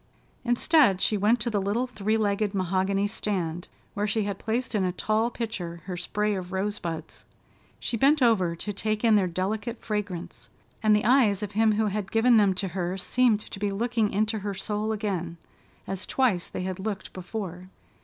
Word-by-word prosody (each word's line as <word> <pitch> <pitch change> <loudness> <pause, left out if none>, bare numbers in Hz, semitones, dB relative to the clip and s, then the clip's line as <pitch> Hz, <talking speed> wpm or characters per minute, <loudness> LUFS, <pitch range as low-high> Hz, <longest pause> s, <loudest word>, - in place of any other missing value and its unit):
Instead, 240 - +4
she 215 - +2
went 210 +4 +3
to 235 +2 -2
the 205 -2 +1
little 205 +6 0
three 220 -3 -1
legged 205 -1 0
mahogany 190 +2 +1
stand, 185 -5 -2 0.3
where 205 0 -1
she 215 +1 0
had 200 -1 -3
placed 240 +3 -2
in 205 -3 +1
a 180 - +1
tall 215 +5 0
pitcher 190 -8 -5
her 185 -1 -4
spray 210 +4 -1
of 185 -2 -5
rosebuds. 190 -5 -3 0.6
She 235 - -2
bent 285 +6 +4
over 205 -9 +3
to 205 +5 -4
take 215 +2 -2
in 225 -2 +5
their 195 -3 +3
delicate 205 +6 -2
fragrance, 195 - -5 0.3
and 215 -1 +5
the 210 - +1
eyes 225 -5 +4
of 205 - -4
him 215 +1 +3
who 215 +1 +1
had 205 -1 -2
given 230 +1 +5
them 200 -3 +4
to 190 +1 -2
her 180 +1 -2
seemed 230 +2 +2
to 195 - -9
be 205 0 0
looking 225 +1 0
into 215 +2 0
her 200 0 -4
soul 210 +3 -2
again, 190 -6 -2 0.5
as 195 0 -4
twice 230 -10 +1
they - - -4
had 185 0 -4
looked 200 -1 -4
before. 185 -1 -6
205 Hz, 185 wpm, -27 LUFS, 190-220 Hz, 0.6 s, in